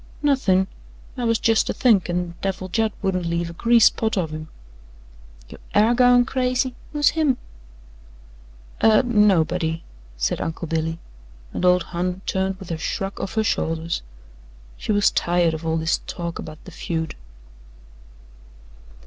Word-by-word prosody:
"Nothin'; 205 -10 +3 0.5
I 250 -2 -3
was 230 -1 +3
jest 225 -1 +2
a - - 0
thinkin' 180 -7 +2
Devil 190 -1 -3
Judd 220 +3 +1
wouldn't 185 -3 0
leave 170 0 -2
a - - -10
grease 230 +4 +4
spot 220 -2 +2
of 165 -4 -1
him." 155 0 -6 1.0
"You - - -12 0.2
AIR 215 +3 +5
goin' 245 0 +5
crazy 255 0 0 0.2
who's 295 -1 +3
him?" 300 -5 +1 1.4
"Uh 220 +2 +5
nobody," 180 -7 +2 0.3
said - - -1
Uncle 165 +1 -4
Billy, 160 0 -1 0.6
and - - -3
old 180 -1 +4
Hon 180 +2 -2
turned 190 0 -1
with 190 -3 -9
a 160 - -3
shrug 195 +4 -3
of 195 - -5
her 220 - +2
shoulders 165 -4 -1 0.7
she - - -3
was 205 -1 +4
tired 175 -1 +1
of 160 +1 -5
all 160 0 +1
this 160 +1 0
talk 170 -1 -5
about 155 0 -9
the 185 - -10
feud. 160 -1 -3
185 Hz, 145 wpm, -22 LUFS, 170-225 Hz, 1.4 s, AIR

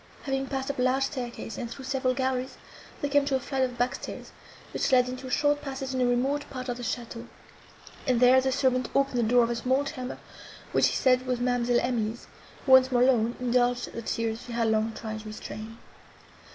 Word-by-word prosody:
Having 270 -1 -2
passed 270 0 -2
up 280 - -9
a - - +2
large 255 +2 +2
staircase, 245 -4 -5
and 235 - -4
through 265 +3 -8
several 260 -2 0
galleries, 260 0 -2 0.4
they 285 - 0
came 285 0 +4
to 275 - +1
a - - +1
flight 265 +1 -3
of 250 -2 0
back 245 +1 +1
stairs, - - -8 0.4
which - - 0
led 250 -1 +5
into 255 +1 -6
a - - -6
short 290 +2 +2
passage 270 -2 -5
in 255 - 0
a 250 - +3
remote 270 +4 0
part 255 -1 -6
of 245 - -2
the - - -7
château, 235 0 -5 0.8
and 250 -2 +3
there 255 +1 +6
the 265 0 0
servant 255 -1 +1
opened 275 -3 +2
the 230 -1 +1
door 245 -1 +6
of 230 - 0
a - - -1
small 260 +4 +1
chamber, 255 -3 -5 0.5
which - - +4
she - - +1
said 255 0 +3
was 250 -1 0
Ma'amselle 245 -1 +1
Emily's, 230 -2 -2 0.4
who, 265 - +1
once 260 0 +7
more 245 -1 +4
alone, 235 -2 +3
indulged 245 0 +1
the 230 - -5
tears 225 0 -2
she 240 - -8
had 230 -1 +1
long 220 +1 +1
tried 220 -1 -5
to 215 - -10
restrain. 215 +1 -8
250 Hz, 220 wpm, -27 LUFS, 240-265 Hz, 0.8 s, once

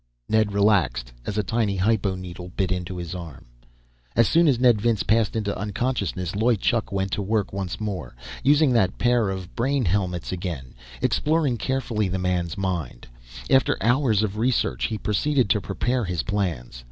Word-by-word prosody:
Ned 110 -1 +2
relaxed, 85 - +2
as 105 - -3
a 105 - +2
tiny 110 0 0
hypo 100 0 +1
needle 90 -1 -8
bit 95 -2 0
into 90 0 -3
his 85 0 -5
arm.... 85 -6 -8 0.7
As 115 - +5
soon 165 0 +4
as 130 -5 +3
Ned 120 -5 +4
Vince 115 -2 +1
passed 110 -1 +2
into 105 -2 -1
unconsciousness, 100 -4 -2
Loy 115 +3 +3
Chuk 110 +2 0
went 95 -1 -1
to 105 - -1
work 105 0 -1
once 95 -3 -4
more, 90 - -4 0.3
using 145 0 +4
that 100 -6 +2
pair 120 -3 +2
of 95 -2 -6
brain 135 +1 +1
helmets 90 -1 -1
again, 85 -9 -5 0.3
exploring 150 -5 +1
carefully 115 -4 -1
the 95 +1 -2
man's 90 -3 -1
mind. 90 -10 -3 0.4
After 130 - +3
hours 115 -1 +2
of 105 -1 -2
research, 110 - +1
he 110 - -2
proceeded 120 +2 +1
to 105 - +2
prepare 120 +5 -1
his 90 -3 -2
plans. 85 - -2
100 Hz, 170 wpm, -24 LUFS, 90-115 Hz, 0.7 s, As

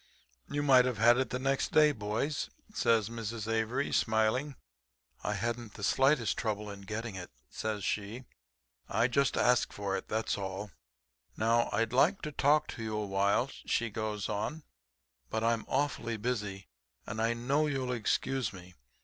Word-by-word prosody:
"'You 145 0 -1
might 130 -3 +6
have 125 -3 -1
had 120 +3 +6
it 130 -3 0
the 125 - -2
next 135 +1 0
day, 150 -1 +6
boys,' 115 +5 -2 0.2
says 115 - +2
Mrs. 115 -1 -5
Avery, 115 +5 0
smiling. 110 +6 +1 0.7
'I - - 0
hadn't 120 -2 -3
the 100 - -8
slightest 135 0 +3
trouble 105 -2 -2
in 100 -1 -9
getting 110 0 -3
it,' 90 -2 -7 0.2
says 110 -2 -3
she. 105 +5 -2 0.7
'I 120 - +2
just 140 +2 +2
asked 125 0 +3
for 100 -1 -2
it, 95 - -4
that's 110 -1 -1
all. 95 +1 -5 0.7
Now, 115 +1 +2
I'd 115 +1 0
like 160 +10 +3
to 150 - -3
talk 145 +2 +3
to 115 - -6
you 110 -1 -2
a 105 - -1
while,' 100 +6 +1 0.2
she 115 -2 0
goes 105 -1 -3
on, 110 +10 -3 0.7
'but 110 0 -1
I'm 115 -1 +1
awfully 130 -4 -1
busy, 105 -4 -3 0.4
and 110 +2 -4
I 115 +1 +2
know 140 +6 +1
you'll 130 -3 -1
excuse 125 +1 0
me. 90 -2 -12
115 Hz, 165 wpm, -31 LUFS, 105-130 Hz, 0.7 s, might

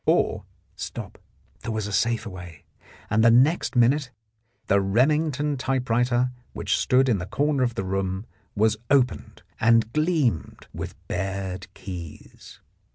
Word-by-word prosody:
Or, - - +2 0.3
stop - - -7 0.4
—there 115 - -5
was 110 -2 -2
a 105 - -5
safer 115 0 0
way, 90 -4 -11 0.5
and 110 +1 +3
the 115 - +7
next 135 +7 +3
minute 130 +3 +3 0.6
the 100 0 +3
Remington 145 +7 +1
typewriter 125 -1 +1 0.2
which - - 0
stood 130 +1 +3
in 110 -6 +2
the 90 - -5
corner 145 +2 0
of 120 -2 0
the 95 - -3
room 95 +1 -2 0.3
was 110 +1 +2
opened 130 -3 +1 0.2
and 115 0 +3
gleamed 155 - 0
with - - -6
bared 95 0 -4
keys. 85 -5 -10
115 Hz, 135 wpm, -25 LUFS, 95-130 Hz, 0.6 s, the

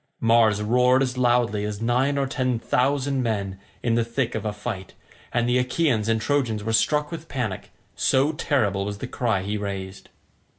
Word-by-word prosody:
Mars 115 -2 +3
roared 125 +4 +4
as 125 -1 -2
loudly 120 -4 +2
as 105 -1 -4
nine 125 +5 +1
or 140 - +1
ten 130 -2 -1
thousand 135 +3 0
men 100 -5 -2 0.2
in 120 - +1
the 115 0 +2
thick 115 +1 -2
of - - -4
a 105 - 0
fight, 105 -2 -6 0.4
and 120 -1 +1
the 125 +1 +3
Achaeans 125 -4 +1
and 115 0 +2
Trojans 120 -5 0
were 110 +1 -2
struck 150 +6 +2
with 165 -1 -7
panic, 115 -8 -3 0.3
so 135 +3 +2
terrible 110 - 0
was 100 0 -4
the 120 - -5
cry 115 -6 -1
he 105 +2 -2
raised. 100 -1 -6
120 Hz, 180 wpm, -24 LUFS, 105-130 Hz, 0.4 s, roared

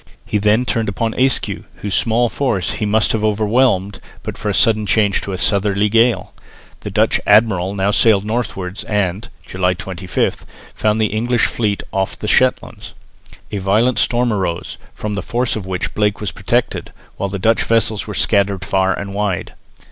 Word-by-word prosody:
He 105 - -1
then 105 +4 +2
turned 115 -4 -1
upon 110 +3 -2
Ayscue, 130 0 0
whose 100 -2 -5
small 120 +1 +2
force 110 -8 -1
he 105 0 -2
must 110 +1 +2
have 110 -1 -1
overwhelmed, 105 -2 +1 0.2
but - - -5
for 110 - -3
a - - 0
sudden 110 -3 +3
change 105 -2 +2
to 100 - -5
a 95 - -3
southerly 100 +2 +1
gale. 115 +2 +2 0.5
The - - -6
Dutch - - +2
admiral 100 -3 +3
now 100 +1 +1
sailed 105 -2 +3
northwards 100 -4 -3
and 105 +1 -1 0.2
(July 90 0 0
25) 95 0 -3 0.3
found 105 0 0
the 110 - +3
English 120 +2 +1
fleet 105 -3 -1
off 95 0 -1
the 105 - -5
Shetlands. 130 +4 0 0.6
A 105 - -2
violent 110 +6 +2
storm 120 -1 +2
arose, 90 -4 -3 0.2
from 105 0 -4
the 100 - -2
force 120 +4 -1
of 100 -4 -5
which 95 -1 -3
Blake 105 -1 0
was 105 -3 -3
protected, - - -1 0.3
while 100 - -2
the 100 - -3
Dutch 110 +4 +2
vessels 110 -2 +1
were 105 - -5
scattered 100 -3 +1
far 95 0 +1
and 100 -1 -6
wide. 100 -2 -2
105 Hz, 175 wpm, -18 LUFS, 95-115 Hz, 0.6 s, sudden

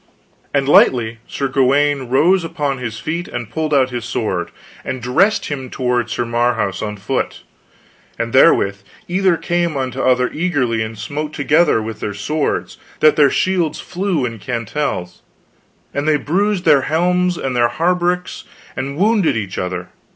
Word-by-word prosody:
"and 140 -1 0
lightly 115 -5 +4
Sir 140 - -2
Gawaine 135 0 +2
rose 175 +8 +3
upon 145 -4 -2
his 115 -3 -5
feet 165 +8 -4
and 120 -3 -6
pulled 160 -1 -2
out 130 -3 +3
his 120 -2 -4
sword, 110 -6 -2 0.3
and 130 - -4
dressed 125 - +2
him 135 -3 -5
toward 125 -2 -1
Sir 120 +2 -2
Marhaus 115 -4 0
on 105 -1 -4
foot, 120 +7 -3 0.7
and - - -3
therewith 100 0 +4 0.3
either 185 -1 +2
came 170 -3 -1
unto 130 0 -3
other 125 -1 +2
eagerly, 145 -10 0
and 110 0 -4
smote 150 +8 -4
together 150 -4 +2
with 110 0 -6
their 105 - -4
swords, 150 +9 -2 0.2
that 155 -1 +5
their 145 -3 +5
shields 180 0 0
flew 180 -7 -2
in 115 -2 -5
cantels, 115 -4 -3 0.7
and 145 +2 -2
they 155 -1 +4
bruised 190 +5 0
their 140 -2 +6
helms 180 +4 +1
and 130 -2 -3
their 120 -1 +3
hauberks, 180 +4 -1 0.3
and 140 +2 -4
wounded 205 - +2
either 100 -4 -3
other. 90 0 -5
135 Hz, 155 wpm, -18 LUFS, 120-165 Hz, 0.7 s, their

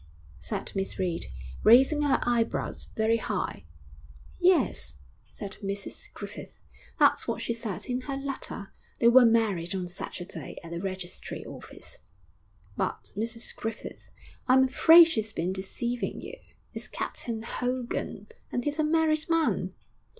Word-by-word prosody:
said 80 +1 -4
Miss 195 -1 -3
Reed, 180 -3 -1 0.4
raising 265 +6 +6
her 290 -2 +3
eyebrows 235 -1 0
very 220 +1 +3
high. - - -3 0.7
'Yes,' 350 - +2 0.3
said 200 0 -8
Mrs 200 0 -5
Griffith, - - -8 0.4
'that's - - +4
what - - -1
she 235 - -1
said 225 -5 -5
in 250 0 -2
her 275 +1 -4
letter; 275 -7 -5 0.3
they 235 - +5
were 245 0 +8
married 200 -7 +2
on 185 -2 -2
Saturday 175 0 -7
at 170 0 -8
a 170 - -3
registry 185 -1 -5
office.' - - -11 0.8
'But, - - -3
Mrs 230 +2 -2
Griffith, 225 0 -6 0.4
I'm 260 +1 +6
afraid 325 +6 +8
she's 220 -10 -1
been 180 0 -1
deceiving 200 +3 -3
you. 445 +7 -9 0.3
It's - - -7
Captain 225 -2 -4
Hogan.... 250 +1 -3 0.3
and 245 - -1
he's 295 +3 -2
a - - +4
married 310 0 +2
man.' 330 -1 +1
230 Hz, 135 wpm, -28 LUFS, 195-270 Hz, 0.8 s, were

